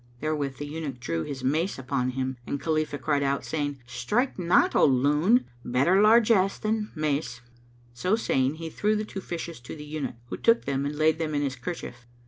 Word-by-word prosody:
Therewith 145 -3 -2
the 145 - -5
eunuch 145 -4 -5
drew 85 -8 -2
his 135 - -5
mace 155 +8 0
upon 130 -1 -1
him, 130 -1 -2
and 140 - -2
Khalifah 155 -2 -1
cried 145 +1 0
out, 140 0 0
saying, 145 -4 -3
"Strike 210 - -1
not, 175 0 +3
O - - +5
loon! 150 - +4 0.2
Better 140 +11 +3
largesse 215 -3 +5
than 215 0 -1
the - - -9
mace." 145 -5 -1 0.5
[FN#227] - - -25
So 185 +8 +2
saying, 135 - +1
he 165 0 -6
threw 210 +5 +1
the 215 0 -1
two 195 -2 -6
fishes 170 -3 -6
to 120 - -9
the 150 -1 -9
eunuch, 145 -4 -4
who - - -4
took 230 0 +3
them 140 0 -1
and 145 - -4
laid 155 +1 +3
them 155 -2 -2
in 145 - +1
his 135 -1 -2
kerchief. 125 -4 -7
150 Hz, 205 wpm, -27 LUFS, 135-180 Hz, 0.5 s, O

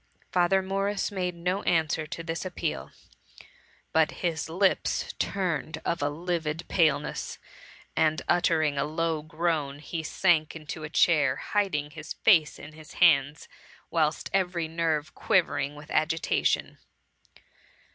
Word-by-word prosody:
'^ - - -41
Father 185 +1 +3
Morris 195 +2 -1
made 180 -3 -2
no 180 +3 -1
answer 160 -3 +1
to 165 +1 -6
this 165 0 -3
appeal, 165 - -3 1.0
but 160 -1 +4 0.2
his 160 -3 -1
lips 185 +4 +1
turned 170 -4 -2
of 170 - -1
a 145 - +1
livid 165 0 -3
paleness, 155 -5 +1 0.6
and 155 0 +2
ut 175 0 +3
tering 155 -4 +2
a - - +2
low 160 +1 -1
groan, 155 -3 -1
he 160 +2 -5
sank 160 -1 +1
into 155 0 -7
a 150 - -5
chair, 150 -5 +3
hiding 180 -8 -1
his 155 0 -7
face 165 -8 +4
in 150 +2 -11
his 155 -1 -13
hands, 150 -4 +3 0.4
whilst 155 -2 0
every 180 -4 0
nerve 160 -2 -1
qui - - +3
vering 145 -4 -3
with 150 +1 -12
agitation. 160 +1 0
160 Hz, 135 wpm, -27 LUFS, 150-175 Hz, 1.0 s, but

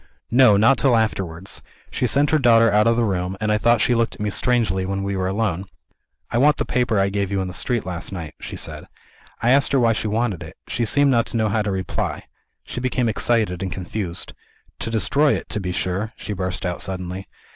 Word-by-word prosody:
"No 120 -4 +6
not 115 +6 +4
till 130 -4 +4
afterwards. 95 -5 -2 0.3
She 125 - 0
sent 140 +5 +2
her 155 - +3
daughter 115 -3 +5
out 105 +2 +4
of 115 - +4
the 120 - +2
room; 95 -2 -2
and 110 0 0
I 105 - +2
thought 120 +1 +3
she 125 - +3
looked 115 -1 0
at - - -18
me 105 0 -1
strangely, 110 -6 +1
when 95 +1 -3
we 100 0 -2
were 95 -1 -1
alone. 95 -2 -1 0.7
'I 120 - +1
want 150 +2 +4
the - - -1
paper 125 -2 0
that 100 - +3
I 100 - +1
gave 100 -1 -1
you 100 -1 -1
in 95 - -2
the 90 - -7
street, 120 +4 0
last 90 -1 -5
night,' 85 -5 -6
she - - -6
said. - - -5 0.6
I 120 - +4
asked 140 +1 +3
her 135 - +4
why 115 -2 +3
she 110 - -2
wanted 105 -4 -1
it. 80 - -10
She 120 - -1
seemed 140 +5 +3
not 115 -2 +2
to 115 - -2
know 110 -1 +1
how 110 +1 +1
to 105 - -2
reply; 95 -1 -3 0.4
she - - -5
became 125 -1 0
excited 110 -4 +1
and 95 -1 -3
confused. 90 -1 -3 0.5
'To - - -3
destroy 140 +6 +2
it, - - -6
to 105 - -2
be 90 -2 -3
sure!' 95 +5 -2
she 105 - -6
burst 95 -1 -3
out 90 -1 -2
suddenly. 95 0 -5
105 Hz, 235 wpm, -22 LUFS, 95-120 Hz, 0.7 s, No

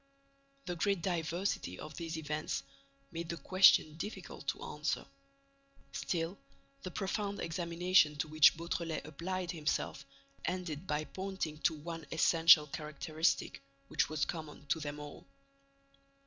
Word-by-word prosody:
The 175 - -3
great 195 0 +1
diversity 170 - -1
of 155 - -8
these 165 0 -4
events 155 0 -2 0.5
made 170 0 -5
the 170 - -3
question 175 -4 +5
difficult 205 +6 -7
to - - -2
answer. - - -2 0.9
Still, 170 +2 -2 0.4
the 185 - -5
profound 200 +2 -2
examination 170 -1 +3
to 145 +2 -2
which 155 0 +6
Beautrelet 165 -2 -3
applied 180 +3 -3
himself 150 -3 -1 0.4
ended 175 -2 -3
by 150 -1 0
pointing 190 -3 -4
to 160 - +2
one 165 0 -7
essential 165 -1 +7
characteristic 155 +2 -1 0.3
which 140 -4 +1
was 155 -2 0
common 155 -3 -6
to 160 - +2
them 150 -1 -5
all. 145 0 -9
165 Hz, 125 wpm, -34 LUFS, 155-180 Hz, 0.9 s, essential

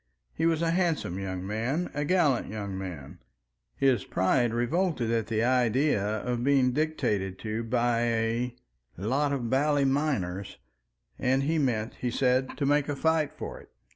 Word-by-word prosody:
He 160 - +1
was 165 0 +1
a 165 - +2
handsome 165 - 0
young 95 -1 -4
man, 120 - -2
a 145 - -1
gallant 155 -7 +2
young 100 -2 -5
man; 90 -8 -7 0.6
his 130 -7 +2
pride 115 +6 +1
revolted 120 +1 0
at 115 -2 0
the 110 -1 0
idea 125 -1 +2
of 115 +4 -2
being 135 -2 +3
dictated 120 -11 -1
to 110 +1 -3
by 120 0 +1
a 115 +1 0 0.4
"lot 135 +10 0
of 130 -4 -1
bally 145 +1 +2
miners," 130 -10 -1 0.6
and 130 +2 +2
he 160 +3 +1
meant, 115 -6 -1
he 125 - 0
said, 130 +1 +1
to 145 - 0
make 145 +1 +2
a 145 - -1
fight 160 +1 +1
for - - -7
it. - - -17
125 Hz, 160 wpm, -28 LUFS, 110-145 Hz, 0.6 s, being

